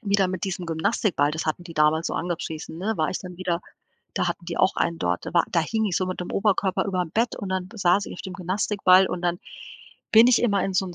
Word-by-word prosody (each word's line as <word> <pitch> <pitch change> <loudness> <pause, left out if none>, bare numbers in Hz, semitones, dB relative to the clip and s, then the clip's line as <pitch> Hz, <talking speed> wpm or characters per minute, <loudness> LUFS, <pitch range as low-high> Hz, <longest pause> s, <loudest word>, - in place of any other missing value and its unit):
wieder 200 -3 +2
mit 185 +1 -3
diesem 185 -2 -4
Gymnastikball 165 -2 0
das 160 +1 -3
hatten 155 +3 -2
die 170 -2 -11
damals 155 +2 +3
so - - -3
angepriesen, 165 -2 -4
ne, 215 +4 -1
war 155 -1 0
ich - - -3
dann 180 -1 -9
wieder 180 -1 -2 0.5
da - - 0
hatten 170 - -4
die 170 - -4
auch 190 - +3
einen 170 -1 0
dort. 90 0 -1
Da - - -6
war 170 - +5
da 170 - +2
hing 220 +6 -1
ich 190 -5 0
so 185 - -1
mit 185 - -4
dem 180 - -5
Oberkörper 195 -1 +1
überm 180 -4 -2
Bett 230 +5 0
und 195 - -6
dann 185 -1 -2
saß 195 -2 +2
ich - - -7
auf - - -9
dem 190 - -7
Gymnastikball 190 0 +3
und 180 - -3
dann 175 0 0 0.7
bin 225 +2 +8
ich 250 -1 +5
immer 200 -5 +2
in 195 - -2
so 190 +1 +1
'n 175 - -8
185 Hz, 260 wpm, -24 LUFS, 170-195 Hz, 0.7 s, bin